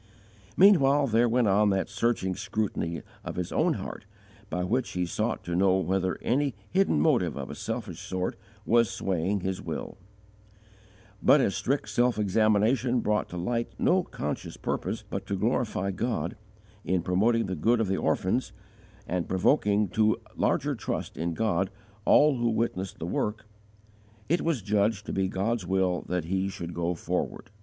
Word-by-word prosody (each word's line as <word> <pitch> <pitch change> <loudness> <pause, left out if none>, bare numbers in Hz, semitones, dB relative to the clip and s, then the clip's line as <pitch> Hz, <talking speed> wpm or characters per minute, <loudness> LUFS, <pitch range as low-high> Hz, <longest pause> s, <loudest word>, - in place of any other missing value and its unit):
Meanwhile 145 -8 +6
there 120 -1 +3
went 120 -1 +2
on 100 +1 +4
that 95 -1 +1
searching 100 -2 0
scrutiny 95 -5 -2 0.2
of - - -6
his 90 -1 -3
own - - +2
heart - - -7 0.4
by 90 - -2
which 120 +7 -1
he 90 0 0
sought 85 - -2
to 85 - -3
know 95 +1 +4
whether 95 0 0
any 135 0 +1 0.2
hidden 190 - +3
motive 75 - +2
of - - -5
a - - -5
selfish - - -5
sort 95 0 -3 0.3
was 115 -1 +4
swaying 95 +2 -1
his 95 0 -3
will; - - -6 1.2
but - - +6
as - - +1
strict 135 -4 -1
self 120 +3 +2
examination 110 +4 +2
brought 105 -1 0
to 90 - -6
light 115 +6 -2
no - - +3
conscious - - -5
purpose - - -3
but - - -5
to 100 - -1
glorify 105 -2 0
God, 95 -5 -2 0.5
in 90 -2 0
promoting 110 +6 +2
the 95 -1 -3
good 115 +9 +2
of 110 - +1
the 95 0 0
orphans, 105 +6 0 0.5
and 90 -1 -2
provoking 100 +1 +2
to 110 +3 +2 0.2
larger - - +1
trust - - -4
in 85 0 -2
God 100 -3 +1 0.4
all 150 -2 +5
who 120 0 +1
witnessed 110 -5 -2
the - - -5
work, 105 +5 -2 0.8
it 170 +4 +2
was 160 - -1
judged 105 0 +1
to - - -4
be 95 -1 +1
God's 100 +1 -1
will 95 -2 +1
that 90 -1 -1
he 95 +3 -1
should 85 -3 -6
go 85 +1 -1
forward. 85 - -3
100 Hz, 165 wpm, -28 LUFS, 95-115 Hz, 1.2 s, Meanwhile